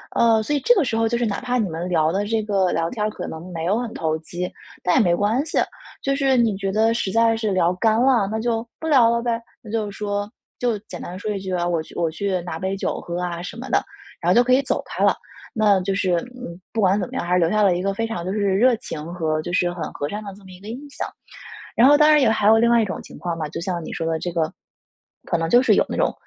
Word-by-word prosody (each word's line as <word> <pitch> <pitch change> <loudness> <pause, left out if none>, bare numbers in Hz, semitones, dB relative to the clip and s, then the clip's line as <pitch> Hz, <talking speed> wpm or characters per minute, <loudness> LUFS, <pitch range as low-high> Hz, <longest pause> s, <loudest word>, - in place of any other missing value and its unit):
呃， 225 -1 +4
所 295 - -2
以 290 - +2
这 485 - +5
个 375 - +3
时 230 -4 -1
候 225 0 +2
就 235 +1 0
是 240 - 0
哪 205 -3 -2
怕 250 -1 -1
你 215 -6 0
们 165 +2 -4
聊 160 -3 +2
得 200 +3 -1
这 220 0 0
个 195 -3 +1
聊 165 +1 0
天 220 - -6
儿 - - 0
可 215 - -6
能 170 +3 -8
没 165 -1 -4
有 195 +5 +2
很 240 -2 -4
投 160 -1 -1
机， 175 +3 -5 0.3
但 180 - +2
也 - - +6
没 175 -5 +3
关 220 - +1
系。 325 - -3 0.5
就 275 - +1
是 270 -1 +2
你 225 -4 +2
觉 195 0 -2
得 220 +3 +3
实 195 -4 -1
在 225 0 +3
是 220 -2 -1
聊 180 -2 +2
干 220 +4 +2
了， 250 -6 +3
那 220 - -2
就 230 0 -1
不 320 - -4
聊 255 -7 +5
了 235 0 +1
呗， 235 -1 -1 0.2
那 215 - -10
就 220 -2 -1
是 200 - -11
说 205 0 -2 0.3
就 240 -3 0
简 190 -4 -10
单 180 +1 -7
说 210 +2 -3
一 200 - -2
句 190 -1 -5
啊， 175 -1 0
“我 170 -2 0
去 - - -15
我 165 -2 0
去 190 +1 -2
拿 170 -2 -6
杯 190 +2 -2
酒 195 - -2
喝 175 +1 -4
啊” 175 -1 -3
什 180 - -7
么 255 +3 -7
的， - - +3 0.4
然 175 - 0
后 - - +4
就 240 - +6
可 255 - 0
以 265 - +5
走 265 - -1
开 - - -6
了。 - - +4 0.4
那 210 -5 +3
就 195 +1 -1
是， 190 -2 0 0.2
嗯， 180 -9 -8
不 225 - 0
管 195 +2 +3
怎 180 - -2
么 - - -13
样， - - -2
还 175 - 0
是 180 - +4
留 165 -1 +3
下 215 +1 +2
了 190 -3 +4
一 180 - -2
个 195 +1 0
非 225 +2 -2
常 175 -7 -4
就 185 - -2
是 210 - -1 0.2
热 245 +4 +4
情 155 -9 -7
和 155 -3 -1
就 175 - -6
是 175 -1 +2
很 175 - -8
和 145 - -3
善 210 +4 -4
的 200 - -7
这 200 - -17
么 190 - -13
一 180 - -13
个 200 - -12
印 235 - -5
象。 - - -4 0.7
然 240 - +6
后 290 +1 +6
当 300 - +6
然 300 - +6
也 260 - +4
还 215 -2 +1
有 220 - +7
另 235 +1 +3
外 235 -1 +5
一 - - +2
种 190 - -5
情 - - -12
况 170 -2 -3
吧， 155 - -2
就 155 - -6
像 175 -2 -3
你 - - -7
说 165 - -3
的 160 -1 0
这 175 - -4
个， 160 -2 0 0.8
可 - - +1
能 165 0 -1
就 245 - +6
是 - - +4
有 - - +3
那 - - -4
种 - - +1
205 Hz, 325 characters per minute, -22 LUFS, 175-230 Hz, 0.8 s, 有